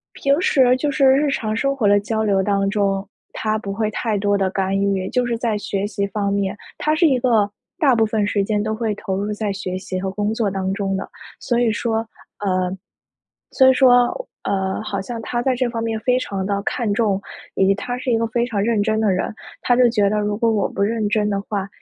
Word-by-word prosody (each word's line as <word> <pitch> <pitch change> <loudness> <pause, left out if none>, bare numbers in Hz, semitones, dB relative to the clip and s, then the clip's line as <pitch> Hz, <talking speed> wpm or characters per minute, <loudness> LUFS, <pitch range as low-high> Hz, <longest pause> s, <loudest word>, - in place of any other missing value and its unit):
平 280 +4 +1
时 255 -7 +4
就 290 +3 -1
是 275 0 +2
日 275 +3 +4
常 215 -5 -1
生 275 +2 0
活 220 -6 +2
的 205 0 +5
交 220 +2 -2
流 200 -3 +2
当 195 0 +1
中， 200 -1 0 0.3
他 215 0 -1
不 200 -2 -5
会 215 0 -1
太 220 0 -1
多 205 0 +1
地 195 -1 +1
干 190 0 -1
预。 195 -1 0
就 250 -1 +1
是 235 -1 -1
在 225 -3 -1
学 200 0 -2
习 200 -1 -2
方 200 0 -2
面。 200 0 -1 0.2
他 305 - +1
是 330 +3 +2
一 265 -4 +3
个 225 -5 +2 0.3
大 270 -6 +4
部 225 -1 +3
分 215 -1 0
时 205 0 +1
间 205 0 0
都 215 0 -2
会 220 -1 -1
投 195 -2 -4
入 205 +1 -2
在 210 -1 -2
学 185 -1 -4
习 185 0 -4
和 190 0 -2
工 210 +1 -1
作 225 -2 0
当 190 -1 -2
中 195 -1 -1
的， 195 - -5 0.3
所 240 -1 0
以 240 -2 +3
说， 225 +1 -1 0.3
呃 185 -2 0 0.8
所 260 -1 +5
以 - - +7
说， 255 - +4 0.2
呃 190 0 -1
好 205 -2 -3
像 230 +4 -6
他 240 +2 -2
在 260 +1 +1
这 250 -1 0
方 230 -1 -3
面 225 -1 -2
非 250 +2 +2
常 195 -6 -3
地 200 -1 -1
看 225 -2 -1
重。 205 -3 +1 0.4
以 190 - +3
及 195 - +4
他 245 +5 -4
是 250 - -3
一 - - +3
个 230 - 0
非 235 +2 0
常 205 -5 -1
认 225 -1 +1
真 220 0 +1
的 215 -2 +2
人， 185 +4 -2 0.3
他 245 - +3
就 250 -1 +5
觉 205 -3 +2
得 210 +1 0
如 205 0 -1
果 230 0 +2
我 210 -3 +1
不 200 - -6
认 215 +1 +1
真 210 0 +1
的 200 -1 -1
话， 200 -1 -3
210 Hz, 260 characters per minute, -21 LUFS, 200-235 Hz, 0.8 s, 以